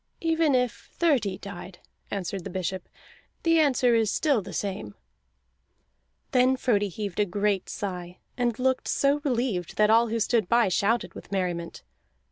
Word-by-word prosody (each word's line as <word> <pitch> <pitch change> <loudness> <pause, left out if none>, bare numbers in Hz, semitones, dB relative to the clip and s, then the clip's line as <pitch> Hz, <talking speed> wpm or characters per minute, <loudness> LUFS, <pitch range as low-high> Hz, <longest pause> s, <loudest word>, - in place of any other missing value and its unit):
"Even 325 -3 +2
if 250 -2 -1
thirty 245 - +1
died," 190 -2 -9 0.3
answered 195 -1 -4
the - - -6
bishop, 185 0 -4 0.5
"the 330 -1 +4
answer 260 -5 +3
is 225 -2 +3
still 280 -4 +2
the 195 0 -9
same." 200 0 -4 1.4
Then 260 -1 +4
Frodi 205 -6 +1
heaved 200 0 -5
a 210 - +4
great 200 +1 0
sigh, 180 -3 -5 0.2
and 240 -3 0
looked 260 0 0
so 285 +1 +2
relieved 240 - -1
that 215 0 +4
all 230 +1 +5
who 230 +1 -1
stood 220 -3 +1
by 235 -3 +4
shouted 215 +6 +1
with - - -12
merriment. 175 -3 -3
215 Hz, 150 wpm, -26 LUFS, 190-255 Hz, 1.4 s, all